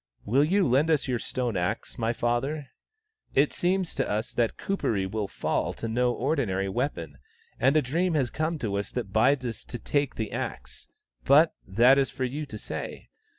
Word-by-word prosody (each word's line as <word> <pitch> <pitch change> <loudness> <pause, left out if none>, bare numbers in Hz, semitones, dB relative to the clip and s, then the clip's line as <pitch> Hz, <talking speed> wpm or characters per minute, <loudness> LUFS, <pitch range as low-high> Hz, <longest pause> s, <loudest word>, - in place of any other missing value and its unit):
" - - -37
Will 130 +7 +3
you 190 +4 +3
lend 135 +6 +3
us 155 -4 +2
your 125 -2 0
stone 120 -2 -2
axe, 90 +7 -2
my 115 0 +1
father? 130 +5 -1 0.7
It 140 +2 +4
seems 185 0 0
to - - -1
us 110 +3 -2
that 115 -2 0
Kuperee 110 - -1
will 105 +1 -2
fall - - -1
to 115 - -5
no 120 +2 +1
ordinary 120 -8 0
weapon, 95 - -3 0.4
and 135 +4 +4
a 155 - +3
dream 165 +7 0
has 135 -5 +1
come 155 +2 -1
to 105 -7 -2
us 100 - -3
that 110 -6 -4
bids 130 +4 +3
us 115 -2 -4
take 140 +3 -2
the 110 - -3
axe. - - -6 0.4
But 150 +4 +5
that 120 +8 +5
is 135 - +1
for 130 0 -4
you 145 +4 -3
to - - -7
say. - - -6
125 Hz, 190 wpm, -27 LUFS, 110-145 Hz, 0.7 s, But